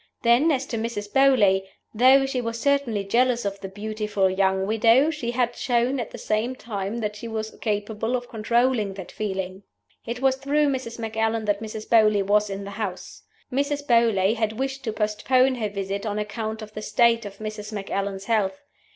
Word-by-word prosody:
Then, 245 +7 +4
as 270 -2 0
to 230 -4 -4
Mrs. 215 -3 -4
Beauly, 210 -9 +4 0.3
though 260 +4 +6
she 270 -2 -2
was 230 0 -4
certainly 275 -7 +1
jealous 240 +3 +1
of 200 0 -3
the 195 - -6
beautiful 210 -1 -1
young 190 0 +1
widow, 230 +8 +4
she 290 -7 -4
had 240 0 0
shown 245 +2 +1
at 235 - -4
the - - -9
same 220 +4 -1
time 215 -1 -4
that 210 -1 -2
she 220 +2 -7
was 220 -1 -4
capable 215 +2 -1
of 245 -1 -4
controlling 230 -2 +1
that 190 -3 -8
feeling. 190 -2 -4 0.5
It 235 +1 -3
was 265 0 +2
through 290 +2 +1
Mrs. 255 -4 -3
Macallan 225 0 -1
that 205 0 0
Mrs. 215 -1 -6
Beauly 215 -3 +4
was 210 +1 +2
in 195 0 -5
the 200 - -7
house. 200 -3 -6 0.3
Mrs. 285 +2 -1
Beauly 225 -5 +3
had 220 -1 0
wished 270 +3 -3
to 220 - -1
postpone 220 +5 +2
her 225 -4 -2
visit 200 0 -4
on 205 0 -2
account 215 +1 -4
of 215 0 -11
the 215 - -6
state 230 +1 +3
of 200 -1 -8
Mrs. 215 0 -6
Macallan's 195 -1 -3
health. 200 -1 0
220 Hz, 185 wpm, -24 LUFS, 205-245 Hz, 0.5 s, though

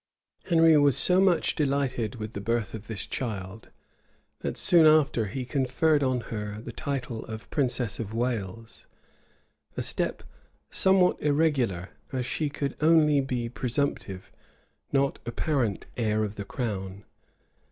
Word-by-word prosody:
Henry 165 -2 +5
was 145 -3 +4
so 180 +1 +5
much 185 -3 +3
delighted 135 -5 -1
with 110 -1 -6
the 100 - -5
birth 115 0 -1
of 110 -1 -8
this 110 -4 -4
child, 105 -4 -5 0.7
that - - -4
soon 165 -3 +5
after 145 -8 +4
he 125 +5 -4
conferred 145 +3 +1
on 130 -2 +1
her 105 -1 -4
the 110 - -8
title 130 -6 -4
of 110 0 -8
princess 125 -5 -1
of 110 -3 -4
Wales,[] 115 -2 -4 0.9
a - - -1
step - - -2 0.5
somewhat 190 -1 +3
irregular, 140 - +1 0.2
as 130 -2 -2
she 145 +5 -1
could 140 -1 -3
only 155 -2 +5
be 125 -3 -2
presumptive, 120 -6 -3 0.6
not 140 0 +1
apparent 120 - -1
heir 110 -2 +1
of 105 -1 -3
the 100 - -6
crown. 100 -4 -4
125 Hz, 135 wpm, -27 LUFS, 110-145 Hz, 0.9 s, Henry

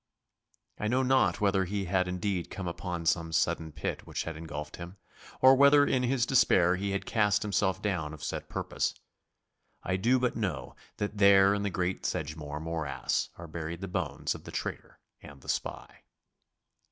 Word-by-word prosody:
I 105 - -1
know 130 +4 +2
not 125 -9 +2
whether 95 -2 +2
he 100 +1 -2
had 90 0 +1
indeed 90 0 -2
come 95 -2 -5
upon 85 -1 -4
some 80 0 +1
sudden 80 0 0
pit - - -4
which - - -3
had 80 - -5
engulfed 75 -2 -7
him, 85 +3 -9 0.4
or 130 +1 +8
whether 140 +2 +6
in 130 - +1
his 125 -1 +1
despair 90 -9 +4
he 100 +2 -2
had 100 0 -2
cast 105 -2 +2
himself 100 -1 0
down 90 -7 -1
of 80 -1 -10
set - - -4
purpose. - - -2 0.9
I 95 - 0
do 120 +7 +3
but 125 -1 0
know 105 -5 -3 0.2
that 105 0 -3
there 100 0 +7
in 100 - -1
the 100 - 0
great 90 0 -2
Sedgemoor 75 -1 -4
morass 75 -5 -2
are 85 - -8
buried 85 +2 -5
the 95 - -4
bones 90 - -2
of - - -10
the - - -9
traitor - - -5 0.2
and 70 -2 -13
the - - -11
spy. - - -4
95 Hz, 175 wpm, -30 LUFS, 85-105 Hz, 0.9 s, or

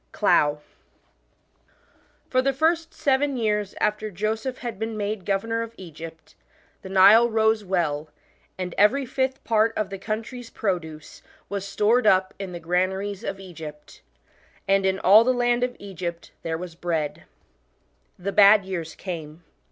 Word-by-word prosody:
CLOUGH. 150 0 +2 1.6
FOR 255 - +2
the 270 +1 +1
first 325 +3 +1
seven 275 0 +1
years 210 -3 -1
after 210 +1 0
Joseph 220 +6 -3
had 235 -5 -6
been 225 0 -3
made 205 -2 -3
governor 225 +3 0
of 230 0 -7
Egypt, 165 -2 -11 0.5
the 190 - -9
Nile 200 +5 +7
rose 220 -1 +2
well, 160 -6 -1 0.5
and 180 -1 -4
every 260 +7 +4
fifth 260 +1 -2
part 225 0 +2
of 210 -2 -2
the 195 - -6
country's 225 +4 -5
produce 160 -7 -4 0.3
was 200 -1 -4
stored 215 +4 +2
up 185 -1 +3
in 195 -2 -5
the 175 - -6
granaries 190 +4 -1
of 195 - -4
Egypt, 160 -5 -10 0.6
1 195 0 +4
and 195 - -3
" - - +4
in 190 0 +1
all 205 +4 +7
the 255 +2 +2
land 245 0 +1
of 250 0 -1
Egypt 175 -4 -6
there 160 -1 -3
was 175 0 -7
bread." 165 -3 -3 0.9
The 195 +2 -3
bad 200 0 +6
years 170 -4 -5
came. 165 -3 -7
200 Hz, 150 wpm, -24 LUFS, 180-225 Hz, 1.6 s, Nile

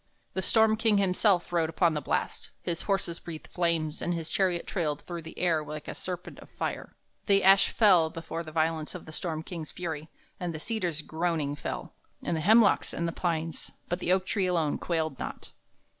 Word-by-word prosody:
The 190 - -1
storm 220 +2 +4
king 220 -2 +3
himself 190 -1 +2
rode 165 -2 +2
upon 165 0 +3
the 150 - -1
blast; - - -2
his 170 -1 -2
horses 185 -4 -1
breathed 165 -2 -8
flames, 165 -3 0
and 175 - 0
his 165 -1 -5
chariot 180 -3 +1
trailed 150 -6 -1
through 175 -1 -5
the 160 - -11
air 165 -4 +2
like 150 0 -7
a - - -4
serpent 180 -1 -6
of - - -13
fire. - - -4 0.3
The 200 -1 +4
ash 195 +1 +7
fell 180 -8 +5
before 165 +1 -5
the 155 -2 -8
violence 160 +1 0
of 180 - -8
the 155 - -9
storm 160 -1 -3
king's 165 -3 -6
fury, 160 -3 -5 0.3
and 175 -2 -3
the - - -4
cedars 175 -6 -1
groaning 160 -3 -1
fell, - - -5 0.3
and 170 - 0
the 160 - -1
hemlocks 220 +4 +5
and 170 - -1
the - - -1
pines; 165 -2 -2 0.2
but 175 - -1
the 180 - 0
oak 185 0 +3
tree 190 -1 0
alone 165 -5 +1
quailed 160 -5 -1
not. - - -6
170 Hz, 200 wpm, -29 LUFS, 160-185 Hz, 0.3 s, ash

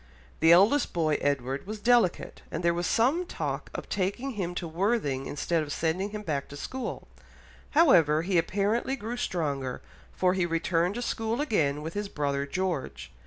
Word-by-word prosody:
The 160 +1 +6
eldest 205 +12 +5
boy, 155 -3 +1
Edward, 140 +2 -1
was 215 +1 -5
delicate, 235 -4 +2
and - - -4
there 170 0 +3
was 175 0 -1
some 270 +10 +2
talk - - -4
of - - -5
taking 205 +8 -2
him 180 -6 -3
to 175 - -3
Worthing 165 - 0
instead 165 +3 -1
of 150 -1 -5
sending 170 +6 -1
him 210 0 -6
back 145 -7 -2
to 145 - -9
school; 260 - -5 0.7
however, 165 - +5
he 180 -1 +2
apparently 210 +9 0
grew 235 -1 -5
stronger, 140 - -2 0.3
for 180 -1 +1
he 185 -2 0
returned 170 +2 0
to 245 - -3
school 225 0 -2
again 150 - +1
with 160 +1 -5
his 205 -1 -3
brother 140 -3 -1
George. 180 -3 -3
175 Hz, 170 wpm, -28 LUFS, 155-215 Hz, 0.7 s, The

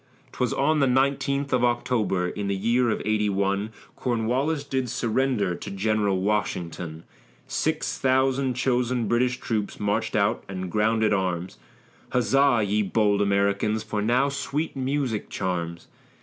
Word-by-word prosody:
'Twas - - -1
on 155 -1 +2
the 135 - +3
nineteenth 140 +2 +1
of 125 -1 +2
October, 120 -6 +1
in 100 +2 -4
the 100 - 0
year 120 +5 +2
of 110 - -1
'81, 100 -1 0 0.3
Cornwallis 130 +6 0
did 130 -3 -2
surrender 115 -4 0
to - - -7
General 100 -1 0
Washington; 90 -5 -2 0.4
Six - - -1
thousand 130 0 +2
chosen 125 -2 0
British 125 +1 +1
troops 105 -3 -3
march'd 105 0 0
out - - +1
and 95 -2 -5
grounded 110 0 +2
arms; 90 -7 -2 0.5
Huzza, 125 -1 +3
ye 105 +2 +1
bold 105 0 +2
Americans, 100 +2 +1
for 105 -1 -3
now 125 +6 +2
sweet 145 +3 -3
music 130 -4 -2
charms. 85 -2 -3
110 Hz, 135 wpm, -25 LUFS, 100-130 Hz, 0.5 s, the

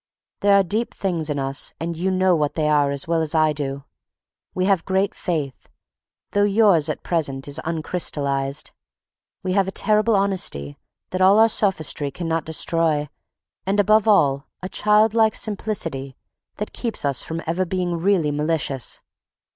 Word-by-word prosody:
There 200 0 +4
are 200 - +5
deep 215 +6 -1
things 170 -5 -2
in 145 - -2
us 135 0 0
and 170 +1 -3
you 180 +4 -1
know 185 -1 +2
what 150 -2 -1
they 155 -2 0
are 145 -2 +3
as 140 +1 -3
well 165 0 +1
as 160 0 -2
I 155 -1 +3
do. 140 -1 -4 0.7
We 185 - 0
have 190 -4 +2
great 190 +1 0
faith, 150 -7 -4 0.6
though 205 - +2
yours 200 -6 +3
at - - -4
present 145 -6 -2
is 145 +2 -1
uncrystallized; 145 -4 -2 0.7
we 185 -1 -1
have 195 -1 +2
a - - -3
terrible 215 +2 +3
honesty 185 - 0 0.4
that 185 - -2
all 190 +2 +6
our 225 +1 +6
sophistry 160 -9 0
cannot 165 +1 -3
destroy 160 -2 0 0.6
and, 200 +2 +1
above 215 +2 +4
all, 140 -10 +3 0.2
a 185 - -4
childlike 215 +2 +3
simplicity 165 - -3 0.4
that 210 - -6
keeps 230 - -2
us 140 -2 +1
from 165 +1 -5
ever 170 +3 0
being 180 -1 -2
really 170 -4 +1
malicious. 150 -3 -2
170 Hz, 160 wpm, -22 LUFS, 150-195 Hz, 0.7 s, all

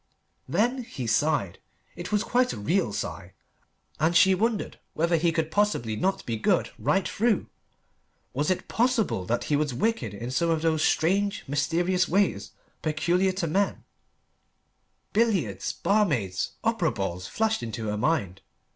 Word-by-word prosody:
Then 235 - +1
he 130 - -6
sighed: 115 - +1 0.4
it 175 +3 -7
was 210 0 +2
quite 250 +1 +1
a - - -6
real 160 - +1
sigh, 100 -2 -5 0.7
and 165 +3 +3
she 190 +2 +6
wondered 220 +2 -1 0.2
whether 170 +2 +2
he 165 +1 +2
could 160 -1 -1
possibly 160 - +1
not 190 - -1
be 115 -2 -2
good 110 - +1
right 150 - +1
through. 220 -1 +1 0.9
Was 145 +3 0
it 185 - -1
possible 230 - +1
that 120 - 0
he 150 - 0
was 145 -3 0
wicked 125 - -1
in 120 +4 -5
some 170 +6 +1
of 160 -1 0
those 160 -1 +2
strange, 200 +5 +1
mysterious 175 +6 +1
ways 200 +2 +1 0.3
peculiar 170 +5 +1
to 185 -2 -2
men: 195 +5 0 1.3
billiards 180 - +1
barmaids 140 - 0
opera 225 -8 +1
balls 90 -3 -4
flashed 220 - 0
into 115 -1 -4
her 105 - -2
mind. 105 - 0
165 Hz, 145 wpm, -26 LUFS, 120-200 Hz, 1.3 s, she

